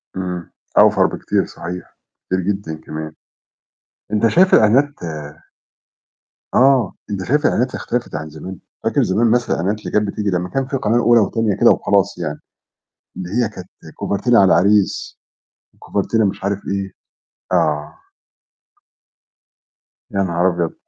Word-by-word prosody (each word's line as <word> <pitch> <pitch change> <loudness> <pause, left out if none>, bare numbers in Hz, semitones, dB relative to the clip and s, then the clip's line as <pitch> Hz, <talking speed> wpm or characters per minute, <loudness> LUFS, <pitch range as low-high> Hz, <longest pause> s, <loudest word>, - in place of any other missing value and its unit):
امم. 90 -2 -5 0.3
أوْفَر - - +6
بكتير - - -1
صحيح. 90 +2 -8 0.3
كتير 95 - -1
جدًا 95 -3 -3
كمان. 80 0 -6 1.0
أنت 110 +2 +3
شايف 185 +10 +4
الإعلانات 130 +7 +5 1.6
آه، 130 -5 +4 0.2
أنت 100 -2 -3
شايف 145 - +1
الإعلانات 125 +2 +1
اختلفت 120 -8 -3
عن 75 +1 -5
زمان؟ 80 +4 -9 0.2
فاكر - - +2
زمان 110 +5 +2
مثلًا 120 +1 +1
الإعلانات 100 +6 -1
اللي - - -7
كانت 105 0 +1
بتيجي 105 +1 -2
لمّا 90 -1 -1
كان 135 -1 -1
فيه 135 - -2
القناة 110 -2 0
الأولى 120 0 +5
والتانية 110 +1 0
كده - - +5
وخلاص 100 0 +1
يعني. - - -4 0.8
اللي 90 -1 -5
هي 115 +2 0
كانت 90 -1 -10 0.3
كوفرتينا 115 +4 +2
على 95 - +5
العريس، 100 0 +2 0.6
كوفرتينا 110 +3 0
مش 95 -1 -2
عارف 100 0 0
إيه، 100 0 -3 0.6
آه. 75 -1 0 2.1
يا 100 - -2
نهار 90 0 +1
أبيض! 85 -2 -2
100 Hz, 135 wpm, -19 LUFS, 90-115 Hz, 2.1 s, أوْفَر